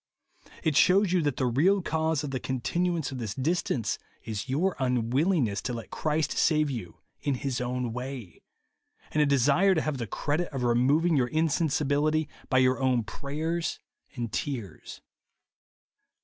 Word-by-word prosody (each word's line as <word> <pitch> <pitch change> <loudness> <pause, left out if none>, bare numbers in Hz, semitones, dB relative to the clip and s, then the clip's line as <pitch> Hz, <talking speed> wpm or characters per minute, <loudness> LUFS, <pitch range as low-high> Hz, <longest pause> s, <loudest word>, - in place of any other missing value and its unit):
It 155 -3 +1
shews 185 +4 +5
you 180 - +3
that 145 -4 -1
the 130 - +1
real 170 +11 +3
cause 160 -2 0
of 145 - -4
the 130 - -2
continuance 165 +6 -1
of 130 - -5
this 110 -3 -4
distance 135 - -1 0.2
is 110 +3 -5
your 170 +8 +1
unwillingness 125 - +1
to 125 - -3
let 115 -1 -7
Christ 155 0 0
save 155 -2 +2
you 115 -9 -6 0.2
in 140 -2 0
his 130 -1 -2
own 125 -1 -2
way, 125 -6 -7 0.3
— - - -33
and 155 - +2
a 150 - +4
desire 140 +8 +4
to 160 - +2
have 150 -4 -2
the 115 - -3
credit 150 - -1
of 135 -3 -3
removing 140 +8 +3
your 130 -3 +2
insensibility 155 0 +1 0.2
by 130 - +3
your 130 0 +3
own 130 -3 +2
prayers 155 +8 -3 0.4
and 120 -4 -4
tears. 115 - -5
140 Hz, 160 wpm, -28 LUFS, 125-160 Hz, 0.4 s, shews